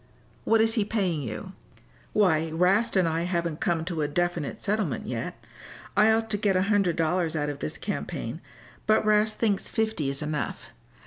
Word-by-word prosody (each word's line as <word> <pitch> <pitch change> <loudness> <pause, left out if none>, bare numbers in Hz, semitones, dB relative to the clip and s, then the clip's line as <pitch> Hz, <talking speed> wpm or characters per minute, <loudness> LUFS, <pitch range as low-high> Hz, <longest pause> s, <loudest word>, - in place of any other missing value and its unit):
"What 225 -1 +4
is 225 0 +4
he 220 - +3
paying 195 -7 -1
you?" 115 -5 -6 0.6
"Why, 165 -6 +3
'Rast 190 +8 +2
and 185 -3 +4
I 165 0 0
haven't 170 -2 -1
come 165 -2 0
to 170 -3 -2
a 150 - +1
definite 175 +3 -1
settlement 210 -7 -1
yet. - - -4 0.6
I 215 +2 +6
ought 225 0 +1
to 205 - +1
get 200 -2 +1
a 185 - +3
hundred 200 -4 +2
dollars 165 0 0
out 150 -1 0
of 145 -1 -5
this 75 - -3
campaign, - - -4 0.5
but 215 0 +4
'Rast 215 0 +3
thinks 210 -4 0
fifty 220 - -1
is 140 +2 -3
enough. 150 -1 -4
180 Hz, 180 wpm, -27 LUFS, 160-215 Hz, 0.6 s, I